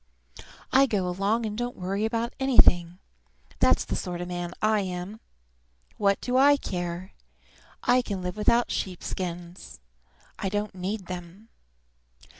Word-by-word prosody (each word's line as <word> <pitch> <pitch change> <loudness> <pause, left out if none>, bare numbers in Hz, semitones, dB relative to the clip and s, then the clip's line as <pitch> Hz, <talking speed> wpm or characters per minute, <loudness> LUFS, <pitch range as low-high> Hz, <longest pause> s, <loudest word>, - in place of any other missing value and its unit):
I 270 +1 +6
go 200 -6 0
along 200 +6 0
and 210 -1 -3
don't 240 +2 -3
worry 195 +4 -1
about 230 +1 -1
anything. 180 -10 +5 0.6
That's - - +4
the - - -2
sort 175 -1 -4
of 175 - -4
man 175 -1 -3
I 215 0 +3
am! 185 +2 -4 0.8
What 200 -1 +2
do 250 0 0
I 285 +2 +6
care? 175 -4 -4 0.7
I 250 +1 +4
can 200 -6 -4
live 180 +1 -3
without 235 +3 +2
sheep 185 -2 -3
skins. 175 - -6 0.6
I 195 - -1
don't 205 +1 -2
need 190 +2 -4
them. 180 +4 -8
195 Hz, 140 wpm, -27 LUFS, 180-225 Hz, 0.8 s, I